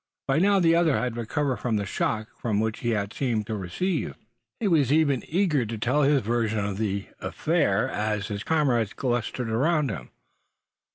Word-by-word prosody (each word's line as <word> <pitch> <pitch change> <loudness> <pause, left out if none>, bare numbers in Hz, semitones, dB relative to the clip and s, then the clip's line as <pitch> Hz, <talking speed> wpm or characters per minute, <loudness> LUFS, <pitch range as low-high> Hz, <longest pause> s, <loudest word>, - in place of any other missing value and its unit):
By 135 +3 +2
now 200 +2 +4
the 165 -2 +4
other 165 -4 +3
had 125 -2 -2
recovered 130 +3 -1
from 120 -3 -1
the 100 -1 -1
shock 110 +3 -1 0.2
which 110 -1 0
he 115 -2 0 0.2
seemed 115 -6 -1
to 110 - -4
have 105 - -3
received. 175 - -2 0.4
He 225 - 0
was 150 -8 +3
even 145 -4 +3
eager 165 -6 +2
to 115 0 -4
tell 125 +7 +1
his 140 -2 +3
version 110 -2 0
of 100 0 -3
the 100 -2 -1
affair, - - +1
as 105 -1 -2
his 100 -1 -4
comrades 130 -9 +1
clustered 120 -2 -2
around 145 +3 +2
him. 65 -10 -7
120 Hz, 175 wpm, -26 LUFS, 110-150 Hz, 0.4 s, now